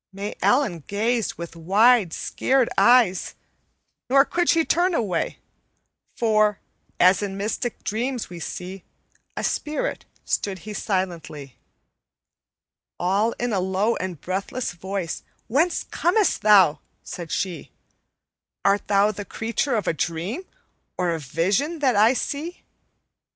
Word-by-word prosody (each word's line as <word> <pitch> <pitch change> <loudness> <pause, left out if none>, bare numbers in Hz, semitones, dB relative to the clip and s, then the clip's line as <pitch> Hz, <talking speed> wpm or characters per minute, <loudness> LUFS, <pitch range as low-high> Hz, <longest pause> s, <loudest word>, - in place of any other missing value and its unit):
May 200 +2 -5
Ellen 210 - +2
gazed 225 +2 0
with 170 0 -8
wide, 200 +4 +4
scared 260 +7 0
eyes, 235 -7 +4 0.7
Nor 275 +2 +6
could 345 +2 0
she 325 -1 +4
turn 355 +1 +2
away, 190 - -1 0.8
For, 215 -3 +2 0.4
as 185 +3 +5
in 195 -1 -4
mystic 215 +4 -3
dreams 240 +3 -2
we 175 -1 -9
see 180 +3 -6 0.5
A - - -2
spirit, 300 -1 -2 0.2
stood 195 -2 -1
he 215 - -6
silently. 170 -9 -4 1.4
"All 200 +6 +1
in 245 -2 -2
a 195 - +1
low 190 +5 +1
and 180 -4 -5
breathless 195 - -3
voice, 185 -1 -4 0.2
'Whence 315 +9 +1
comest 385 +4 +1
thou?' 190 -8 +6 0.2
said 170 -2 -7
she; 180 -5 -3 1.0
'Art 200 +1 +2
thou 205 +1 +3
the 205 0 -6
creature 230 +5 -2
of 210 - -1
a - - +2
dream, 170 - -3 0.5
Or 180 -1 +1
a 165 - -2
vision 190 - 0
that 265 -6 +2
I 215 +4 +5
see?' 310 +7 -4
205 Hz, 125 wpm, -23 LUFS, 180-245 Hz, 1.4 s, Nor